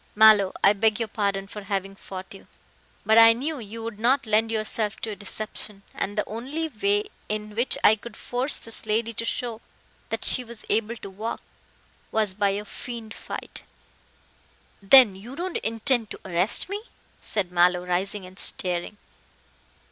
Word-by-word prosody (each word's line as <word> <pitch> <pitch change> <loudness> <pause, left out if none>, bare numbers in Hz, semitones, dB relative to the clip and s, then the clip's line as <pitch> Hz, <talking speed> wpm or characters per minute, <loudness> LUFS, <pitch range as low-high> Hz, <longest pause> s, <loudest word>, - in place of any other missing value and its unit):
"Mallow, 210 -3 +7
I 200 - +7
beg 210 +1 +2
your 230 - -1
pardon 200 -2 -1
for 210 +1 -9
having 195 -1 -3
fought 190 -1 -9
you, 195 - -14 0.6
but 220 +1 +6
I 225 0 +9
knew 285 +5 -3
you 225 0 -8
would 225 -2 -6
not 245 +3 +2
lend 220 +1 +2
yourself 215 -1 0
to 220 - -3
a - - -5
deception, 205 0 -5
and 205 +2 -3
the 210 - 0
only 270 +9 -4
way 205 -4 0 0.2
in 210 0 -4
which 235 +4 0
I 220 - +6
could 225 0 -11
force 250 +4 -1
this 225 -1 -5
lady 225 +2 0
to 230 - -4
show 230 -1 -3 0.5
that - - -2
she 255 - +4
was 235 -2 -8
able 225 +2 +1
to 205 - -9
walk 215 +4 -5 0.7
was 215 -3 +1
by 200 +1 +1
a 205 +1 -3
feigned 230 0 -8
fight." - - -7 1.2
"Then 220 +1 +7
you 225 +8 -10
don't 355 +3 -3
intend 230 0 +1
to - - -8
arrest 180 +3 +1
me?" 405 +2 -4 0.4
said 195 -4 -2
Mallow, 180 0 +3
rising 190 +2 -1
and 185 +2 -11
staring. 180 +3 +2
215 Hz, 170 wpm, -25 LUFS, 200-230 Hz, 1.2 s, I